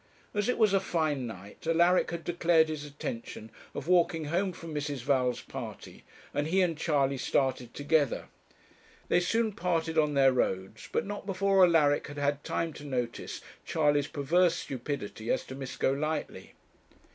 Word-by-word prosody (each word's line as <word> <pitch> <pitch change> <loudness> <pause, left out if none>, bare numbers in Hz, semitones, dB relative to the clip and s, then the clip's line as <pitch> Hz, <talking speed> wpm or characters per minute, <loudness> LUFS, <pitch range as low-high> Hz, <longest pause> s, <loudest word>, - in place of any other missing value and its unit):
As 205 +2 0
it - - +1
was 215 -3 +4
a 195 - +5
fine 155 -8 -1
night 100 - -10
Alaric 170 +2 +4
had 170 0 -5
declared 170 -2 +3
his 155 -2 -4
intention 115 -6 -6 0.2
of 140 - -5
walking 175 -2 +3
home 180 +5 0
from 165 -2 -9
Mrs. 145 -4 -3
Val's 125 -2 +1
party, - - -8 0.3
and 145 +1 0
he 185 +3 +3
and 170 -2 0
Charley 140 -4 +1
started 130 -3 0
together. 145 -2 +1 0.8
They 175 - +4
soon 220 +5 +1
parted 165 -5 0
on 150 -2 +2
their 135 -1 +5
roads, 95 -3 -2
but - - 0
not 205 0 -6
before 195 0 +3
Alaric 155 -5 +4
had 145 0 -9
had 145 0 0
time 165 -1 -2
to - - -10
notice 125 -4 -3 0.2
Charley's 145 -2 +2
perverse 165 +5 +2
stupidity 120 -4 -5
as - - +1
to - - -9
Miss 135 -1 -6
Golightly. 155 +4 -2
150 Hz, 160 wpm, -30 LUFS, 135-175 Hz, 0.8 s, a